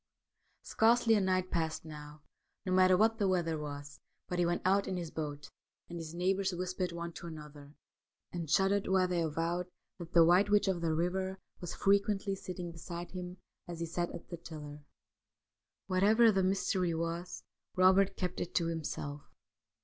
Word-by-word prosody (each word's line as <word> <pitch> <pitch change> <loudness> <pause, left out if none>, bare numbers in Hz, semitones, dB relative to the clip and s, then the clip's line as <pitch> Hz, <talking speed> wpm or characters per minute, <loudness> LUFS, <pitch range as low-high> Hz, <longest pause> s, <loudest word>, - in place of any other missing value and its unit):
Scarcely 230 0 +3
a 210 - +4
night 185 -1 0
passed 160 -2 -1
now, 150 -1 -10 0.4
no 185 - -2
matter 185 0 +5
what 225 +3 +3
the 200 - +2
weather 170 -4 0
was, 145 -1 -7 0.3
but 180 - -2
he 175 - +3
went 175 0 -1
out 195 +2 +3
in 185 - -2
his 170 -3 -5
boat, 145 -2 -5 0.4
and 170 0 -6
his 165 0 -7
neighbours 190 +2 +1
whispered 185 0 -2
one 170 0 -5
to 170 - -8
another 150 -2 -10 0.3
— - - -60
and 170 -3 -4
shuddered 195 +4 +2
while 185 -1 +3
they 175 -1 0
avowed 165 +3 -1 0.2
— - - -56
that 170 -1 -8
the 170 -1 +7
White 180 +5 +5
Witch 205 -1 +4
of 185 -3 0
the 170 - 0
Eiver 180 +4 -1 0.2
was 175 - -6
frequently 200 0 +2
sitting 180 -2 -6
beside 170 +1 -7
him 180 0 -6 0.3
as 170 -1 -6
he 170 - -1
sat 175 +1 -2
at - - -9
the 170 - -5
tiller. 150 -3 -9 1.0
Whatever 210 +5 +5
the 195 -2 +2
mystery 185 -2 +1
was, 170 +2 -4 0.3
Eobert 190 +1 +5
kept 180 -1 -3
it 175 - -5
to 165 -1 +2
himself. 145 -3 -4
175 Hz, 180 wpm, -32 LUFS, 165-190 Hz, 1.0 s, the